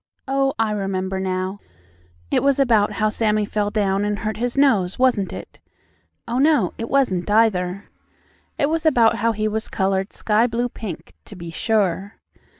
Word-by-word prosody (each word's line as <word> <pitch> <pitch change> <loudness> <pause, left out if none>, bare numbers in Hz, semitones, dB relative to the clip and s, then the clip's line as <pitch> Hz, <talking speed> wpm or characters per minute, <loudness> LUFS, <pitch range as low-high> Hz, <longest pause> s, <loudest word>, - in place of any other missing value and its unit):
Oh, 270 0 +1
I 225 -1 +1
remember 190 -2 -2
now, 185 +1 -3 0.7
it - - +2
was 280 -1 +2
about 230 -7 +3
how 215 -1 +1
Sammie 215 -1 0
fell 205 0 -1
down 200 -2 0
and 205 0 -1
hurt 215 0 -3
his 245 +3 -2
nose, 210 -11 +3
wasn't 245 -7 +2
it? - - -9 0.7
Oh, 240 +2 -1
no, 280 - +3
it 230 - -4
wasn't 210 -10 +1
either. 200 -3 +2 0.7
It 285 - +2
was 320 +1 -1
about 245 -8 +4
how 230 +2 +1
he 215 -1 -1
was 220 +1 -3
colored 195 -1 -1
sky 220 +2 +1
blue 240 +1 -1
pink; 210 -8 -8
to 205 - -11
be 170 -2 -8
sure. 200 0 -1
215 Hz, 165 wpm, -21 LUFS, 195-235 Hz, 0.7 s, about